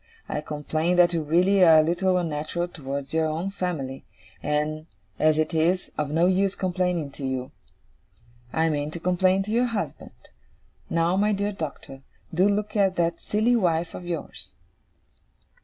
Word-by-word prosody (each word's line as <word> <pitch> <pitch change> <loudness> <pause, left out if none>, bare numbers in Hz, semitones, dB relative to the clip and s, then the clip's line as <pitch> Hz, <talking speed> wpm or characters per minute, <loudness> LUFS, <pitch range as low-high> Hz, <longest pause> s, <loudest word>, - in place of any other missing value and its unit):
I 150 - -3
complain 155 +3 -1
that 175 -1 +5
you 165 - 0
really 180 +6 +3
are 160 -2 +8
a - - 0
little 180 +3 +1
unnatural 165 +1 -2
towards 140 -4 -6
your 160 0 +2
own 165 +5 -2
family; 155 -9 -4 0.4
and, 150 +1 -1 0.3
as 155 0 +4
it 155 +2 0
is 170 +3 +1
of 150 -1 -2
no 165 +3 +2
use 190 +1 +2
complaining 180 -5 -1
to 140 - -10
you. 130 -1 -3 1.0
I 160 +1 +1
mean 145 -1 -1
to 170 - -6
complain 185 +2 +2
to 210 - -6
your 240 +3 +3
husband. 230 -3 -6 0.6
Now, 165 +2 +1
my 210 +1 +2
dear 200 +1 -1
Doctor, 145 -6 -7 0.3
do 185 +5 +4
look 210 +1 -1
at 195 -3 +3
that 170 -1 0
silly 220 +4 +2
wife 170 -6 +1
of 175 - -8
yours. 170 -3 -6
170 Hz, 160 wpm, -25 LUFS, 155-185 Hz, 1.0 s, are